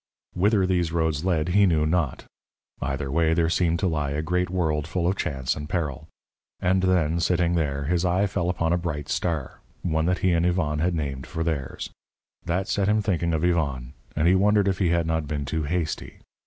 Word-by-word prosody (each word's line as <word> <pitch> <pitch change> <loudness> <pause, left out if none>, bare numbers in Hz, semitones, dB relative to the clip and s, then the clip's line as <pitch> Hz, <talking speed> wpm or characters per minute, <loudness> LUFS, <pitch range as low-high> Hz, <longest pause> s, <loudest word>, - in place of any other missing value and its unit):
_ - - -3
Whither 100 -1 +4
these 90 -3 +1
roads 80 -1 0
led 85 -3 +1
he 100 +2 +5
knew 80 -3 +2
not. 80 -4 -1 0.6
Either 70 0 -2
way 80 +1 +2
there 85 -1 +2
seemed 85 -2 +2
to 95 - +2
lie 75 -4 -1
a 75 +2 -2
great 90 +2 0
world 80 -5 0
full 85 0 -1
of 95 - +1
chance 65 -8 -2
and 75 +1 -7
peril. 80 -4 -3 0.5
And 95 +1 +2
then, 85 -3 +2
sitting 85 0 +2
there, 70 -4 0
his 85 +4 0
eye 90 +2 +2
fell 90 -3 -1
upon 85 -1 0
a 90 - +1
bright 75 -4 -4
star, 80 -7 -2 0.2
one 80 -2 0
that 90 0 +2
he 90 - +4
and 85 -1 +2
Yvonne 85 -4 +1
had 85 +2 +1
named 70 -4 -4
for 80 - -3
theirs. 75 -5 -3 0.5
That 90 +3 -1
set 100 -1 +1
him 105 0 +2
thinking 85 -5 0
of 80 0 0
Yvonne, 70 -8 0 0.2
and 80 +2 +2
he 90 - +6
wondered 100 +1 +3
if 95 -1 0
he 90 -4 +2
had 85 -1 +2
not 80 -2 -1
been 70 -1 -3
too 80 +2 -2
hasty. 80 0 -3
85 Hz, 210 wpm, -25 LUFS, 75-90 Hz, 0.6 s, he